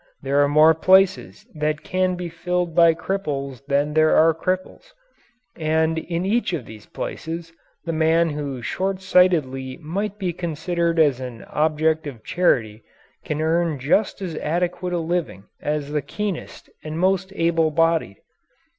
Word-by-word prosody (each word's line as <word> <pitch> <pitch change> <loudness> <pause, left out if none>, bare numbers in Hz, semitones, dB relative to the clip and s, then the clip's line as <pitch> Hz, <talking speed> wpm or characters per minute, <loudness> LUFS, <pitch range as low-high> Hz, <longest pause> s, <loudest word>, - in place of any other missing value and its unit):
There 140 +1 +2
are - - +3
more 155 +2 +6
places 190 +5 +3
that 150 -1 -2
can 185 0 0
be 180 0 -5
filled 180 +1 -2
by 165 0 +5
cripples 140 -8 -4
than 145 +1 +1
there 155 0 +4
are 165 +1 +5
cripples. 185 - -4 0.6
And 160 0 +1
in 170 +2 -3
each 205 -2 0
of 145 -8 -3
these 110 -1 -12
places 165 +1 -6 0.3
the 165 - -2
man 160 +1 +2
who 140 -4 -5
short 190 +6 -2
sightedly 150 -9 +2
might 195 +6 -4
be 185 -4 -2
considered 170 0 -2
as 145 -5 +3
an 125 -3 -7
object 155 0 0
of 120 -6 -9
charity 115 -11 +1 0.4
can 150 0 -3
earn 165 -1 +1
just 190 +9 0
as 175 -4 -4
adequate 180 +3 -2
a - - +1
living 165 - -2 0.2
as 150 -1 -2
the 150 -1 0
keenest 205 +4 -5 0.2
and 155 0 -5
most 190 +1 +1
able 165 -2 +2
bodied. 165 +1 +1
165 Hz, 150 wpm, -22 LUFS, 150-180 Hz, 0.6 s, more